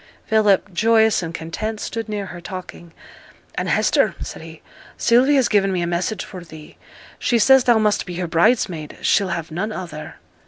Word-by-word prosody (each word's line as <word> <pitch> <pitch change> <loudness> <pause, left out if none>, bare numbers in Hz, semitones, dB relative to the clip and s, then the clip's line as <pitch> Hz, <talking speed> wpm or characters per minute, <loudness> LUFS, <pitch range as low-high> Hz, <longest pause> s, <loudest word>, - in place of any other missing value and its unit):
Philip, 210 -3 +2
joyous 220 +2 +3
and 165 -2 -5
content, 210 +7 -5
stood 225 0 -5
near 205 -2 -3
her 175 -2 -9
talking. 180 -2 -9 0.6
'And, - - -3
Hester,' - - +2
said - - -7
he, 160 0 -12 0.3
'Sylvie 250 +5 +4
has 265 -3 +3
given 195 -2 +2
me 180 -2 -1
a - - 0
message 175 +4 -2
for 185 -2 -9
thee 160 -2 -13 0.4
she 240 - +1
says 260 +3 +5
thou 240 -2 +5
must 210 -2 +1
be 180 - -6
her 180 +1 -2
bridesmaid 170 -2 +1
she'll 200 - +3
have 170 -3 -4
none 195 +7 -3
other.' 170 -6 -7
195 Hz, 180 wpm, -21 LUFS, 170-220 Hz, 0.6 s, says